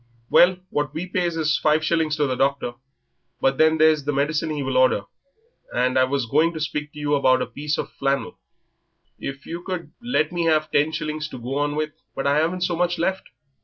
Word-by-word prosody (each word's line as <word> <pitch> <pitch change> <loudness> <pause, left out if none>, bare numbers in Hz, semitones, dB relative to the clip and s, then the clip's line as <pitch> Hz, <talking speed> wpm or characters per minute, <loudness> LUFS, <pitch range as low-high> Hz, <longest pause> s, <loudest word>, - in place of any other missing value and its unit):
"Well, 180 +1 +6
what 145 -1 -2
we 170 - -3
pays 175 -2 -1
is 155 -2 +1
five 155 +1 +2
shillings 160 -2 +1
to 150 -1 +1
the 130 - -1
doctor, 135 -1 0 0.7
but 135 0 +1
then 160 0 +5
there's 155 -2 +4
the 145 - -1
medicine 150 +3 0
he 150 -2 -2
will 130 -1 -2
order, 130 -5 +4 0.7
and 125 +1 +1
I 130 - +5
was 135 -1 -1
going 165 +8 +2
to 160 - -5
speak 150 -1 -3
to 150 - -10
you 145 0 -1
about 130 -3 +3
a - - -3
piece 150 +1 -3
of - - -4
flannel; 135 -4 -2 0.8
if 135 0 -6
yer 170 +1 -6
could 170 -5 -5
let 235 -10 0
me 175 -1 -1
have 155 -1 +2
ten 150 +2 +2
shillings 155 -1 -3
to 130 - -9
go 125 +4 -3
on 145 0 0
with." 155 0 -2 0.2
"But 135 - -3
I 140 +1 +3
haven't 170 +4 0
so 175 -1 0
much 175 +1 0
left. 190 +3 -1
150 Hz, 215 wpm, -23 LUFS, 140-160 Hz, 0.8 s, Well